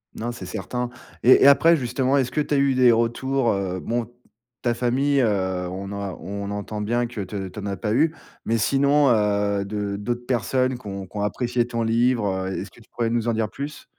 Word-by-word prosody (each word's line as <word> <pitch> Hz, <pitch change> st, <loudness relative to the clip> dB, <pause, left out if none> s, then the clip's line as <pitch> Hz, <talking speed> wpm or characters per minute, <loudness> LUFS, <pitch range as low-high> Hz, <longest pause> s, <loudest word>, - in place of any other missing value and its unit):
Non, 120 Hz, +2 st, -3 dB
c'est 120 Hz, -, -8 dB
certain. 125 Hz, -1 st, -4 dB, 0.3 s
Et 130 Hz, +2 st, +7 dB
et -, -, +8 dB
après 165 Hz, +4 st, +6 dB
justement, 130 Hz, +1 st, 0 dB
est-ce 130 Hz, -2 st, 0 dB
que 150 Hz, -, 0 dB
tu 145 Hz, -, -2 dB
as -, -, +3 dB
eu 140 Hz, -1 st, +3 dB
des 125 Hz, -2 st, +6 dB
retours, 120 Hz, +2 st, +1 dB
heu? 95 Hz, -2 st, -2 dB
Bon, 120 Hz, +2 st, -2 dB, 0.5 s
ta 120 Hz, -2 st, +1 dB
famille, 135 Hz, +4 st, +1 dB
heu, 95 Hz, -5 st, 0 dB
on 95 Hz, +2 st, -6 dB
a 100 Hz, -2 st, -4 dB
on 100 Hz, +3 st, -5 dB
entend 105 Hz, +1 st, -4 dB
bien 120 Hz, +3 st, 0 dB
que 115 Hz, -4 st, -6 dB
tu 95 Hz, -1 st, -5 dB
tu 105 Hz, -, -8 dB
en 100 Hz, -, -6 dB
as 100 Hz, -1 st, -3 dB
pas 105 Hz, -1 st, -1 dB
eu, 155 Hz, +5 st, +2 dB, 0.3 s
mais 115 Hz, +1 st, +1 dB
sinon, 140 Hz, +4 st, +3 dB
heu, 100 Hz, -2 st, +1 dB
de 100 Hz, -1 st, -3 dB
d'autres 120 Hz, +3 st, -3 dB
personnes 130 Hz, +1 st, 0 dB
qui 105 Hz, -, -11 dB
ont 100 Hz, -1 st, -5 dB
qui 105 Hz, -, -11 dB
ont -, -, -1 dB
apprécié 120 Hz, +3 st, 0 dB
ton 115 Hz, -1 st, -2 dB
livre. 115 Hz, -5 st, +1 dB
Est-ce 95 Hz, 0 st, -5 dB
que -, -, -19 dB
pourrais 115 Hz, -1 st, -1 dB
nous 120 Hz, 0 st, -1 dB
en 115 Hz, -, +2 dB
dire 110 Hz, -1 st, -1 dB
plus? 145 Hz, +2 st, -7 dB
115 Hz, 220 wpm, -23 LUFS, 100-125 Hz, 0.5 s, et